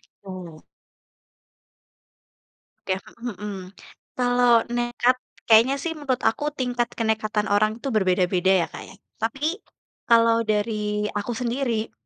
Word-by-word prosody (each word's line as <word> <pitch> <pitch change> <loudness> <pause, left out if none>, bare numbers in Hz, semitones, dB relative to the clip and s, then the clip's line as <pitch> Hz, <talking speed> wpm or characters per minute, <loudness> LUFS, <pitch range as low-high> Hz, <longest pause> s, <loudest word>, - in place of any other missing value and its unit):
gitu. 180 -5 -11 2.2
Oke, 190 0 -1 0.2
mhm 235 -3 -5
mhm. 210 -1 -4 0.6
Kalau 245 -2 +4
nekat, 240 +1 +1 0.3
kayaknya 230 +5 +7
sih 330 +1 -2
menurut 260 -4 -2
aku 295 +6 0
tingkat 245 -2 -1
kenekatan 220 -1 0
orang 215 +3 +2
itu 275 - -2
berbeda-beda 185 -3 +2
ya, - - -1
Kak, - - -8
ya. - - -13 0.2
Tapi, 275 - -1 0.5
kalau 230 -1 +4
dari 210 -1 -1
aku 210 +3 -3
sendiri, 235 -2 -1
225 Hz, 115 wpm, -24 LUFS, 210-245 Hz, 2.2 s, kayaknya